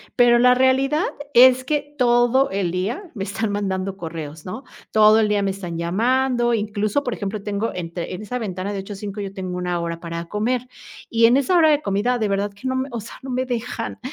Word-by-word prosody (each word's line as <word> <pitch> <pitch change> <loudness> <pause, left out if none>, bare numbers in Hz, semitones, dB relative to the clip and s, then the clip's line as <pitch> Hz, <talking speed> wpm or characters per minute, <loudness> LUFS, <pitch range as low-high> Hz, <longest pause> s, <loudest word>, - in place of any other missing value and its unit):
pero 240 -1 +5
la 250 +1 +6
realidad 270 +5 +2 0.3
es 255 +1 +7
que 290 0 -2
todo 245 +1 +3
el 190 -3 -1
día 225 - -3
me 195 -4 -4
están 215 +1 -2
mandando 195 -1 -2
correos, 160 -3 -7
¿no? 185 +9 -6 0.3
Todo 215 0 +6
el 220 - +3
día 210 -1 +1
me 195 -1 0
están 180 -4 -6
llamando. 240 +7 +1
Incluso, 215 +4 -1
por 245 - -2
ejemplo, 205 0 -4
tengo 210 +2 -2
entre 170 0 -5
en 185 - -6
esa 250 +4 -4
ventana 190 -3 -4
de 200 - -3
8 195 +2 -7
a - - -8
5 200 +1 -6
yo 195 -1 -5
tengo 185 -2 -5
1 180 -1 -2
hora 170 0 -4
para 170 0 -5
comer, 240 +5 -1 0.4
y 230 0 +4
en 235 +2 +5
esa 280 +7 +3
hora 320 -2 +6
de 295 0 +2
comida, 205 +4 0
de 215 -2 0
verdad 200 +1 -1
que 230 +6 -5
no 260 - -1
me, 260 +1 -2
o 235 - -3
sea, 225 - -10
no 265 - -8
me 255 +1 -1
dejan, 240 -2 -4
215 Hz, 225 wpm, -22 LUFS, 195-250 Hz, 0.4 s, es